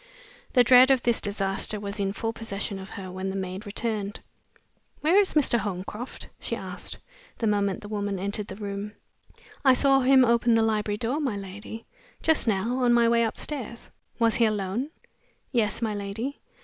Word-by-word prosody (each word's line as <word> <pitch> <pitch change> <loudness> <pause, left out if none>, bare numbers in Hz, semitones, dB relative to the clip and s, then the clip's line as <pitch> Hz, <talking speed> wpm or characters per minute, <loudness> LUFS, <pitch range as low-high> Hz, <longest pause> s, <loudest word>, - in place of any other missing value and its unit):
The 250 - +6
dread 250 +2 +7
of 265 -3 +3
this 235 -1 +2
disaster 200 0 0
was 200 +1 -5
in 195 -1 0
full 225 +2 -3
possession 205 -2 -5
of 190 0 -9
her 190 -2 -7
when 185 +1 -4
the 190 - -4
maid 190 +2 -5
returned. 210 -1 -3 0.8
"Where 335 +7 +5
is 400 -5 +2
Mr. 270 -5 +4
Holmcroft?" 205 +4 -5
she - - -3
asked, - - -6 0.4
the 230 - -2
moment 200 -3 +1
the 205 - -8
woman 205 -2 -2
entered 200 +2 -3
the 190 - -7
room. 205 0 -5 0.7
"I 265 -2 +6
saw 270 +1 +4
him 260 0 +6
open 235 0 +3
the 225 - +4
library 210 -1 0
door, 250 +6 -1
my 260 -9 -1
lady, 205 +3 -8 0.4
just 320 -6 +3
now, 220 +4 +1
on 245 -2 +3
my 235 -1 +5
way 235 0 +4
upstairs." 235 +1 -4 0.3
"Was 230 -2 +3
he 235 - +4
alone?" 215 +5 -1 0.6
"Yes, 230 -2 +1
my 220 -2 0
lady." 205 +7 -4
220 Hz, 175 wpm, -26 LUFS, 200-240 Hz, 0.8 s, dread